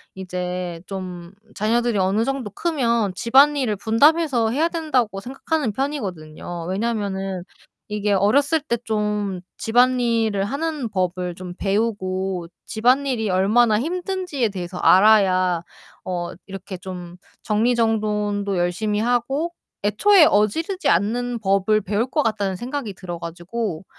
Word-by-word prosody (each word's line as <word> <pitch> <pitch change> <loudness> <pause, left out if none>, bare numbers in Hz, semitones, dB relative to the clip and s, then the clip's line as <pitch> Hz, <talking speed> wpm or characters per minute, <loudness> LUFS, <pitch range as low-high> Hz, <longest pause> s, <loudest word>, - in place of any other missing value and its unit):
이제 180 -2 -4
좀 180 -2 -7 0.2
자녀들이 235 +1 +1
어느 190 +4 +2
정도 270 -5 -2
크면 235 - 0
'집안일을 265 +1 +4
분담해서 245 - +3
해야 310 +7 +1
된다.'고 265 - 0
생각하는 270 +1 -2
편이거든요. 175 - -4
왜냐하면은 195 -3 -2 0.5
이게 210 0 0
'어렸을 280 +11 +3
때 255 -5 -1
좀 210 -3 -1 0.2
집안일을 230 -4 +2
하는 285 +2 -2
법을 180 -2 -2
좀 180 0 -8
배우고 190 -4 -1 0.2
집안일이 245 0 +1
얼마나 210 +4 +3
힘든지에 355 -3 -2
대해서 180 -2 -6
알아야 185 -4 +4 0.4
어 175 -2 -3 0.2
이렇게 195 -1 -7
좀 180 -2 -8 0.3
정리정돈도 210 -3 0
열심히 200 +4 0
하고 245 +8 0 0.3
애초에 330 - +5
어지르지 320 - +1
않는 235 +6 +1
법을 195 +1 +2
배울 205 +4 0
것 300 +4 0
같다.'는 205 -4 -1
생각이 245 -1 -4
들어 175 -2 -6
가지고 175 +2 -5
210 Hz, 290 characters per minute, -22 LUFS, 190-245 Hz, 0.5 s, 애초에